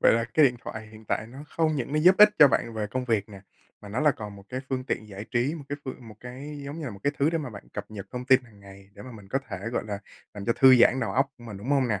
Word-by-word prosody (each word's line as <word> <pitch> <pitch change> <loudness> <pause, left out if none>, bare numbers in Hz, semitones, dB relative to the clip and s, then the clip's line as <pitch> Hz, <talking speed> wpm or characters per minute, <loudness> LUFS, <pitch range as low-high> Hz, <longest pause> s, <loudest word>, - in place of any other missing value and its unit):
Vậy - - +6
là 115 0 +2
cái 155 - +6
điện 125 -3 +3
thoại 110 0 -7
hiện 110 0 -14
tại 110 - -2
nó 125 +4 -12
không 160 -2 0
những 135 +1 -3
nó 155 - +2
giúp 180 +4 +6
ích 210 0 +10
cho 145 - +9
bạn 115 -3 -1
về 105 -1 -2
công 130 +4 -3
việc 110 -4 0
nè, 100 -2 -11 0.4
mà 105 - -11
nó 110 +5 -2
là 150 -1 +5
còn 105 -5 -7
một 100 - -13
cái 130 +1 -4
phương 130 -1 -2
tiện 110 -4 -3
giải 100 +1 -8
trí, 130 +5 +1
một 150 - -8
cái 145 - -3
phương 130 -3 -8
một 110 - -11
cái 140 +4 -8
giống 145 +4 -6
như 155 - -5
là 125 - -4
một 100 - -10
cái 140 - +1
thứ 145 +3 +3
để 165 - 0
mà 140 -5 -5
bạn 100 -3 -11
cập - - -6
nhật 100 -3 -8
thông 125 0 -5
tin 130 0 +5
hàng 105 -4 -19
ngày 100 0 -15
để 100 - -11
mà 130 - -10
mình 100 -3 -13
có 135 - 0
thể, 100 - -5
gọi - - -1
là, 100 -1 -4 0.4
làm 100 - -7
cho 115 - +2
thư 130 -1 +8
giãn 125 +2 +5
đầu 100 - -1
óc 135 +3 +2
của 120 - -14
mình, 105 -4 -8
đúng 110 +8 -6
hông 135 -3 +3
nè? 105 -4 0
120 Hz, 335 wpm, -27 LUFS, 105-140 Hz, 0.4 s, ích